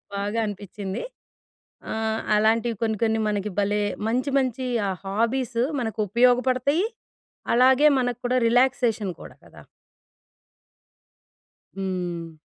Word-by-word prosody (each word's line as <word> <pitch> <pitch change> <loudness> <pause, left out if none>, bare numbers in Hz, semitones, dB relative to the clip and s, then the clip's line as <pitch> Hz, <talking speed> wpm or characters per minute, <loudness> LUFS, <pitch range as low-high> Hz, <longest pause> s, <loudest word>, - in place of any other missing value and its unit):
బాగా 205 +3 -2
అనిపించింది. 205 -1 -5 0.9
ఆహ్, 220 0 -1
అలాంటివి 225 +2 +2
కొన్ని, 220 -1 0
కొన్ని 225 0 +1
మనకి 210 0 -1
భలే 205 +1 +1 0.3
మంచి 250 +5 0
మంచి 255 -1 -2 0.2
ఆ - - 0
హాబీస్ 230 +4 -1 0.2
మనకు 220 -2 -4
ఉపయోగపడతయి, 255 - +3 0.7
అలాగే 260 +4 +5
మనక్కూడా 245 0 -1
రిలాక్సేషన్ 235 -5 +2
కూడా - - -12
కదా! - - -15 2.2
హ్మ్. 180 -3 -3
225 Hz, 95 wpm, -24 LUFS, 205-250 Hz, 2.2 s, అలాగే